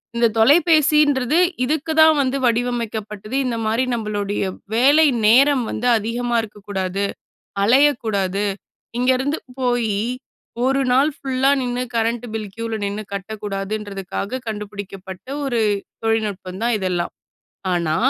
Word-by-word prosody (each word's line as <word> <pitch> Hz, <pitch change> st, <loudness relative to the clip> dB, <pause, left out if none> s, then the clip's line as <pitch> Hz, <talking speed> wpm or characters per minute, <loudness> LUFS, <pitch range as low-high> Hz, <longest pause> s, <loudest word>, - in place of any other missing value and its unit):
இந்த 235 Hz, 0 st, +4 dB
தொலைபேசின்றது 300 Hz, 0 st, +4 dB, 0.3 s
இதுக்கு 310 Hz, +4 st, -1 dB
தான் 315 Hz, 0 st, +7 dB
வந்து 265 Hz, +1 st, 0 dB
வடிவமைக்கப்பட்டது. 230 Hz, -2 st, -2 dB
இந்த 240 Hz, -2 st, -1 dB
மாரி 225 Hz, +4 st, +1 dB
நம்பளுடைய 205 Hz, -3 st, -2 dB, 0.3 s
வேலை 285 Hz, +6 st, +5 dB, 0.2 s
நேரம் 260 Hz, +4 st, +5 dB
வந்து 245 Hz, +3 st, -2 dB
அதிகமா 235 Hz, +2 st, -2 dB
இருக்கக்கூடாது, 200 Hz, -2 st, -4 dB, 0.6 s
அலையக்கூடாது, 220 Hz, -6 st, +2 dB, 0.5 s
இங்கேருந்து 260 Hz, +4 st, +1 dB, 0.2 s
போயி 240 Hz, -4 st, +1 dB, 0.7 s
1 270 Hz, +1 st, +2 dB
நாள் 275 Hz, +5 st, +4 dB
ஃபுல்லா 270 Hz, +1 st, +1 dB
நின்னு 245 Hz, 0 st, -2 dB
கரண்ட் 230 Hz, +1 st, 0 dB
பில் 215 Hz, -2 st, -4 dB
க்யூவில 230 Hz, -1 st, -3 dB
நின்னு 205 Hz, +2 st, -3 dB
கட்டக்கூடாதுன்றதுக்காக 200 Hz, +2 st, -4 dB
கண்டுபிடிக்கப்பட்ட 205 Hz, -2 st, -7 dB, 0.2 s
ஒரு 240 Hz, -4 st, 0 dB, 0.4 s
தொழில்நுட்பம் 205 Hz, -3 st, -2 dB
தான், 235 Hz, -1 st, +2 dB
இதெல்லாம். 180 Hz, -2 st, -2 dB, 0.6 s
ஆனா, 170 Hz, -3 st, 0 dB
230 Hz, 105 wpm, -21 LUFS, 205-255 Hz, 0.7 s, தான்